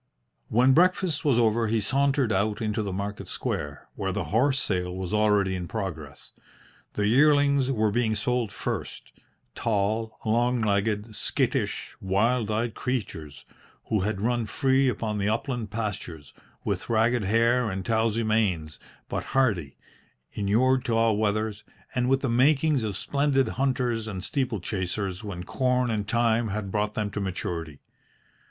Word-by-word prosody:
When 125 +4 +4
breakfast 180 -1 +2
was 140 -6 +3
over 115 -1 +3
he 110 +1 +1
sauntered 135 +3 +1
out 105 +2 0
into 110 0 -1
the 100 -2 -3
market 100 +2 -4
square, 75 0 -4
where - - -2
the - - -2
horse 135 +4 +3
sale 90 -5 -1
was 95 +1 -4
already 105 -3 +3
in 90 -2 -4
progress. 80 -10 -6 0.6
The 105 - 0
yearlings 140 +2 +4
were 110 -4 +1
being 110 0 +1
sold 125 -2 -1
first - - -5 0.4
tall, 110 +1 -1
long 120 +3 +2
legged, 105 0 0
skittish, - - -1
wild 105 +4 +1
eyed 110 +1 -1
creatures, 85 - -4 0.4
who 110 - +2
had 100 +1 -1
run 120 0 0
free 135 +3 +2
upon 110 -2 -2
the 100 +1 +1
upland 115 -1 -2
pastures, 100 -8 -5 0.3
with - - -3
ragged 115 0 +2
hair 115 +3 +3
and 95 -1 -4
towsie 115 0 +1
manes, 95 -9 0 0.3
but - - -3
hardy, 100 - +1 0.5
inured 125 +6 +2
to 115 - 0
all 115 -1 +3
weathers, 110 0 -1 0.3
and 125 0 +1
with 135 0 +3
the 135 - 0
makings 140 +4 +3
of 105 -3 -2
splendid 140 0 +1
hunters 125 -4 -1
and 95 -4 -5
steeplechasers 100 -6 -2
when 90 -4 -5
corn 125 +3 0
and 105 -2 -2
time 115 0 +2
had 105 -1 -4
brought 105 +1 -1
them 105 -1 -2
to 105 - -4
maturity. 85 -5 -4
110 Hz, 145 wpm, -26 LUFS, 100-125 Hz, 0.6 s, When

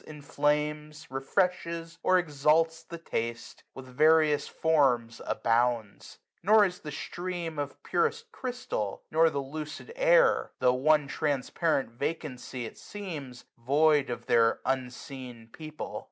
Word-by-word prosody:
Inflames, 150 +1 -2
refreshes, 170 +3 -1
or 185 - +4
exalts 160 0 +2
the 170 - -9
taste. 115 -7 -5
With 130 - -9
various 155 +3 +3
forms 130 -8 +1
abounds. 115 -2 0 0.2
Nor 210 +3 +6
is 180 -2 -4
the 150 - -7
stream 175 0 -5
Of 145 -1 -5
purest 460 0 -1
crystal, 245 - -4
nor 160 +1 +5
the 145 - -5
lucid 155 - -7
air, - - +4
Tho* 125 -1 +3
one 150 +3 +3
transparent 145 -1 -1
vacancy 130 -2 -4
it - - -10
seems, 150 -12 -8
310 115 - -30
Void 150 0 +4
of 120 - -5
their 115 -1 +3
unseen 125 -2 -5
people. 155 -1 -7
150 Hz, 125 wpm, -29 LUFS, 130-165 Hz, 0.2 s, Nor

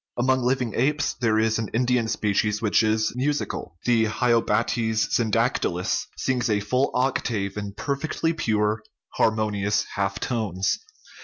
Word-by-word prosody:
Among 130 +1 +2
living 125 -2 0
apes 145 +4 +1
there 110 -3 +1
is 110 0 +2
an 110 - -2
Indian 125 -1 +2
species 105 0 0
which 110 -1 +3
is 110 0 +1
musical; 135 - -2
the 115 -2 +3
hylobates 115 -1 +1
syndactylus 115 -5 0
sings 125 -2 0
a 105 -1 +2
full 125 +7 +1
octave 115 -6 0
in 100 -1 -5
per 140 +7 -2
fectly 160 +3 -2
pure, 110 -6 0 0.4
harmonious 105 -2 +1
half 100 0 -1
tones. 110 - -1
110 Hz, 135 wpm, -24 LUFS, 105-125 Hz, 0.4 s, which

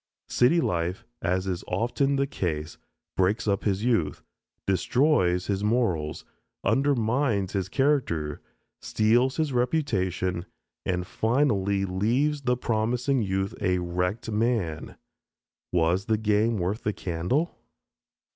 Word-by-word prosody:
City 140 +8 +4
life, 90 - -1 0.2
as 90 +1 0
is 95 -1 -3
often 135 +4 0
the 140 0 +2
case, 80 - -3 0.4
breaks 95 +4 +1
up 100 -1 0
his 100 0 0
youth, 115 -10 0 0.4
destroys 95 - +2
his 100 0 -1
morals, 105 -10 0 0.4
undermines 125 -6 +1
his 95 -2 -1
character, 120 - 0 0.4
steals 120 +5 +2
his 155 -4 0
reputation, 95 - 0 0.4
and 90 -1 -1
finally 100 -3 +1
leaves 120 +11 +1
the 125 -2 +1
promising 120 +3 0
youth 95 -1 -1
a 90 0 +2
wrecked 90 +5 -2
man. 105 -8 -1 0.8
Was 90 +2 +2
the 110 -1 +1
game 110 +1 +2
worth 95 +4 -2
the 105 - -1
candle? 95 - -2
105 Hz, 115 wpm, -26 LUFS, 90-125 Hz, 0.8 s, City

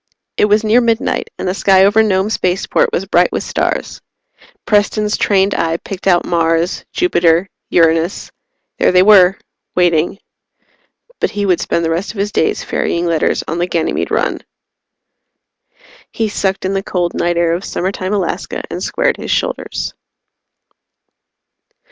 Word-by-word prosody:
It - - +3
was 210 +1 +2
near 220 +3 +4
midnight, 230 -1 -1
and - - -4
the 180 - 0
sky 190 -1 +4
over 210 +2 +4
Nome 200 -1 +1
Spaceport 195 - 0
was 470 - -2
bright - - +2
with - - -2
stars. - - -3 0.6
Preston's 210 0 +1
trained 195 -1 +2
eye 165 0 0
picked 195 +2 -7
out 175 -2 +3
Mars, 165 0 0
Jupiter, 175 - +2 0.2
Uranus. 165 +1 +1 0.5
There - - +3
they 180 0 +5
were 195 -2 +6 0.4
waiting. 175 0 +2 1.0
But - - +1
he 205 -1 -3
would 180 -3 +2
spend 170 - -1
the 165 - 0
rest 175 +7 -2
of - - -13
his 205 +1 -1
days 160 - 0
ferrying 170 +1 -1
letters 165 -2 0
on 165 +2 -3
the 175 - 0
Ganymede 165 -3 -1
run. - - -1 1.7
He 225 -2 -2
sucked 195 -2 -2
in 190 - -1
the 195 - -1
cold 175 -3 -2
night 175 0 -1
air 170 -1 +2
of 175 +3 -3
summertime 185 +1 -3
Alaska 205 -2 -3
and - - -5
squared - - 0
his - - -7
shoulders. - - -2
190 Hz, 150 wpm, -16 LUFS, 170-205 Hz, 1.7 s, were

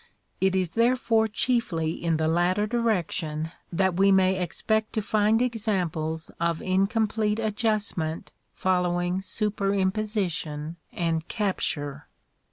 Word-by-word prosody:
It 190 0 +3
is 185 -3 0
therefore 230 -1 +2
chiefly 210 -8 0
in 165 -1 -1
the 160 0 +1
latter 175 +5 +2
direction 175 -9 -1 0.2
that 185 0 +1
we 195 +1 +5
may 190 -1 +3
expect 220 +5 -1
to 220 - 0
find 215 +2 +3
examples 180 -9 -1
of 170 -1 0
incomplete 210 +3 +1
adjustment 210 -7 -1 0.2
following 180 0 +1
superimposi 200 0 0
tion 155 +1 -5
and 165 -1 -1
capture. 150 -8 -2
190 Hz, 110 wpm, -26 LUFS, 170-215 Hz, 0.2 s, we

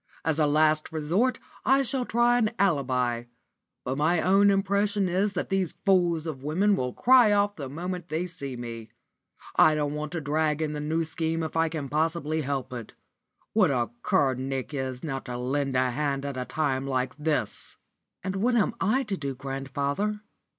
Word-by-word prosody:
As 160 -1 +1
a 150 - +4
last 155 +1 +2
resort 170 +11 +1 0.3
I 270 +1 +4
shall 260 -1 -1
try 240 +1 +3
an 220 -3 +2
alibi. 125 -9 +1 0.6
But 130 +3 -3
my 160 +3 +3
own 195 +3 +4
impression 200 0 +1
is 195 +3 +1
that 180 - -3
these 190 -3 0
fools 175 -4 +3
of 150 -5 -5
women 185 +8 +2
will 125 -7 -2
cry 245 - +5
off 205 0 +2
the 140 -4 -6
moment 175 +4 -5
they 160 +3 -1
see 140 -7 -6
me. 115 -2 -7 0.7
I 155 - +6
don't 145 -1 -1
want 150 0 -4
to 170 - -1
drag 150 0 0
in 155 -1 -1
the 150 - -4
New 160 +3 0
Scheme 160 0 -2
if 160 - -5
I 165 0 +2
can 155 -3 -4
possibly 160 +1 0
help 135 -2 -3
it. 120 -3 -8 0.6
What 205 -6 +4
a 120 -4 0
cur 135 -2 +2
Nick 130 +2 -4
is 130 -2 -4
not 135 -4 -4
to 125 -1 -5
lend 135 +2 -1
a 130 0 +2
hand 140 +1 -1
at 140 -1 -4
a 125 0 -3
time 135 -3 -1
like 130 -1 -1
this!" 150 -8 -2 0.5
"And 190 +1 -2
what 240 +5 +2
am 230 0 +2
I 240 +8 +2
to 210 -5 -2
do, 140 -6 -4
grandfather?" 140 +10 -2
155 Hz, 185 wpm, -27 LUFS, 135-190 Hz, 0.7 s, I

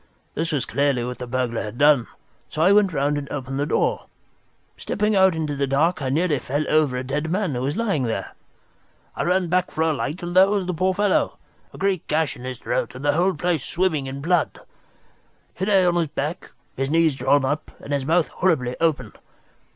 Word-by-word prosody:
This 165 +2 -2
was 145 -6 -1
clearly 140 -1 0
what 125 +1 -5
the 125 - -6
burglar 120 -2 -1
had 105 +2 -7
done, 145 -4 +4 0.4
so 155 - -1
I 185 - +5
went 200 -2 +4
round 145 -1 0
and 140 - -8
opened 135 -1 -4
the 145 - 0
door. - - 0 0.7
Stepping 210 0 -1
out 190 -2 +5
into 155 -2 -2
the 140 0 -1
dark, 155 +6 +1
I 130 - -1
nearly 155 +1 +1
fell 145 +5 -2
over 150 -5 +2
a 125 - -3
dead 145 +4 -2
man, 185 -3 -1
who 125 - -2
was 140 +4 -2
lying 195 - 0
there. 110 -4 -3 0.8
I - - -3
ran 180 0 +1
back 180 +2 +1
for 160 - -1
a 160 -1 +2
light 150 +4 -4
and 175 +1 -4
there 190 +1 +7
was 200 -2 0
the 180 - -2
poor 185 +3 0
fellow, 205 -1 +1 0.3
a - - -12
great 195 -3 -1
gash 155 -1 0
in 125 - -10
his 130 -1 -5
throat - - -2
and 130 +3 -7
the 145 - +3
whole 180 +4 +2
place 175 -5 -1
swimming 160 -6 0
in 135 +1 -6
blood. 170 +2 0 0.9
He 190 - -3
lay 195 -3 +4
on 175 - +3
his 170 -2 +1
back, 150 +3 -4 0.3
his 135 +1 -2
knees 165 0 +3
drawn 135 +1 +2
up, 145 +3 -2
and 145 - -6
his 140 -1 0
mouth 165 +4 +2
horribly 125 -9 0
open. 165 -3 0
155 Hz, 215 wpm, -23 LUFS, 135-180 Hz, 0.9 s, there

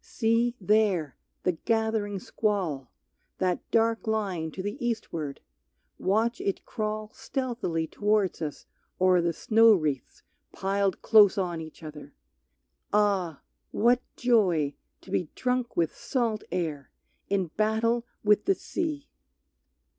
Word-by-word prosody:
See, 235 +1 +1
there, 195 -7 +2 0.3
the 180 - +3
gathering 220 +2 -1
squall, 185 - -2 0.5
That 180 -2 +1
dark 230 0 +2
line 195 -7 -1
to 185 - -5
the 205 +4 -4
eastward, 165 -11 -3 0.6
watch 225 +5 +1
it 195 - -2
crawl 215 -1 -3
Stealthily 240 -11 -2
towards 205 +2 0
us 150 -2 -5 0.3
o'er 185 -1 +5
the 170 0 +1
snow 225 +6 +5
wreaths 150 -7 -3 0.3
piled 195 0 0
Close 210 -4 +6
on 175 -4 -1
each 160 +1 -11
other! 150 -2 -10 0.8
Ah! 195 -6 +1 0.3
what 240 +3 +3
joy 185 - +2 0.3
to - - -13
be 170 - 0
Drunk 250 -1 -1
with 165 -2 +1
salt 230 -5 -1
air, 155 -6 -3 0.4
in 190 -5 0
battle 225 +2 +1 0.2
with 210 0 +4
the 390 - +3
sea! 305 -6 -3
205 Hz, 120 wpm, -28 LUFS, 170-225 Hz, 0.8 s, Close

